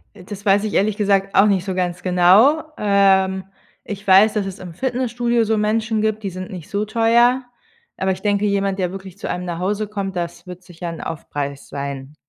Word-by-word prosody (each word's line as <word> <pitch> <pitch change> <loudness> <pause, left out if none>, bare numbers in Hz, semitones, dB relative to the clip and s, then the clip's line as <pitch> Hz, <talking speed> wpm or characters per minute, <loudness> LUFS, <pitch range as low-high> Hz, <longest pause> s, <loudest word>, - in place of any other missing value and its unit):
Äh, - - -13
das 200 0 -9
weiß 200 +1 +4
ich 215 - -3
ehrlich 205 +1 +2
gesagt 195 -1 +1
auch 195 - +6
nicht 195 -3 +1
so 190 -2 -3
ganz 180 -1 -2
genau. 190 - +5 0.2
Ähm, 190 -2 +3 0.4
ich 205 -1 -7
weiß, 195 +3 +6
dass 210 -2 -1
es 195 +1 -6
im 175 -3 -9
Fitnessstudio 240 0 0
so 220 0 +1
Menschen 220 +1 0
gibt, 215 0 -1
die 195 - -3
sind 185 0 -7
nicht 180 -5 -9
so 205 +1 -1
teuer, 235 +3 +3 0.5
aber 190 0 0
ich 185 - -7
denke, 205 -1 +1
jemand, 200 -1 0
der 180 -2 -1
wirklich 195 0 -9
zu - - -5
einem 180 0 -3
nach 170 -2 -4
Hause 205 +4 -1
kommt, 200 -2 -4
das 170 +1 -5
wird 180 0 -10
sicher 175 -1 -8
'n 165 -1 -7
Aufpreis 145 -3 -5
sein. 140 0 -6
195 Hz, 210 wpm, -20 LUFS, 180-210 Hz, 0.5 s, auch